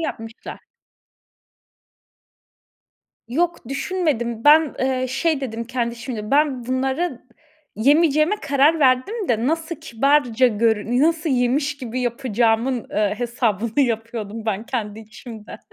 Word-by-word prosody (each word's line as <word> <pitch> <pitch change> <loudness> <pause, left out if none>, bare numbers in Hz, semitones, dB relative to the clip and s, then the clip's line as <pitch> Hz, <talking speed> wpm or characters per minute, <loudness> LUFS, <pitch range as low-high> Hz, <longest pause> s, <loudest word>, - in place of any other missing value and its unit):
yapmışlar. 225 -8 -6 2.7
Yok 335 -1 -1
düşünmedim. 275 -7 -2
Ben, 305 0 +6
eee, 260 -1 0
şey 285 +3 0
dedim 230 -3 -4
kendi 235 -1 -2
içimde. 230 -3 -6
Ben 280 -4 +1
bunları 265 +3 -2 0.5
yemeyeceğime 305 - +3
karar 285 +3 +3
verdim 290 - +1
de 230 +1 +1
nasıl 325 +2 -2
kibarca 265 -3 +2
görün 225 +1 +1
nasıl 320 0 +1
yemiş 270 +3 +1
gibi 255 -1 -5
yapacağımın, 240 0 0
eee, 210 -1 0
hesabını 235 -1 -1
yapıyordum 225 -3 -3
ben 215 +1 -2
kendi 220 -4 -4
içimde. 220 0 -11
255 Hz, 105 wpm, -21 LUFS, 230-290 Hz, 2.7 s, Ben